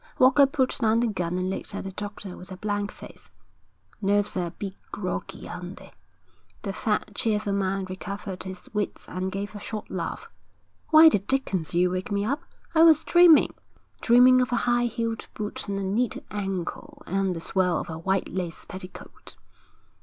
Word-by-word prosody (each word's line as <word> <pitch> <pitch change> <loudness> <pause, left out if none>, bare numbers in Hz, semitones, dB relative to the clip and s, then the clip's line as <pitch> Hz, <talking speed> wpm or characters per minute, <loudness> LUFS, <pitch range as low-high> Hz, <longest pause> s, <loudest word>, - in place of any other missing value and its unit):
Walker 265 +2 +6
put 270 -3 0
down 225 0 +3
the 240 - +2
gun 180 -5 -2
and 185 +1 -1
looked - - -4
at - - -4
the 195 - -5
doctor 205 -1 -6
with 180 - -11
a 185 - -7
blank 205 0 -2
face. - - -13 0.7
'Nerves 205 0 +2
are 180 -2 0
a - - -4
bit 195 +3 -6 0.2
groggy, 185 -3 -4
aren't 180 +1 -7
they?' - - -14 0.7
The 195 -3 -3
fat, 210 +1 -1
cheerful 210 -1 0
man 195 -1 0
recovered 190 +1 -6
his 185 -1 -7
wits 210 -2 -3
and 185 +1 -3
gave 200 +2 -4
a 205 - -7
short 215 +1 -6
laugh. 185 - -4 0.6
'Why 320 +1 +9
the 305 - +5
dickens 195 - -1
did 170 - -1
you 180 0 +3
wake 185 +3 -3
me 200 0 0
up? 280 +7 -1 0.3
I 320 - +5
was 325 -2 +7
dreaming 345 -3 +6 0.5
dreaming 250 +2 +6
of 250 - -1
a - - +2
high 240 0 +3
heeled 230 -1 -3
boot 210 0 -5
and 200 0 -2
a 195 - -2
neat 215 +5 0
ankle 205 - -4
and 195 -2 0
the - - -4
swirl 180 +1 +1
of - - -4
a 160 -1 -6
white 190 +3 0
lace 175 -2 -5
petticoat.' 185 0 -10
200 Hz, 185 wpm, -26 LUFS, 185-230 Hz, 0.7 s, Why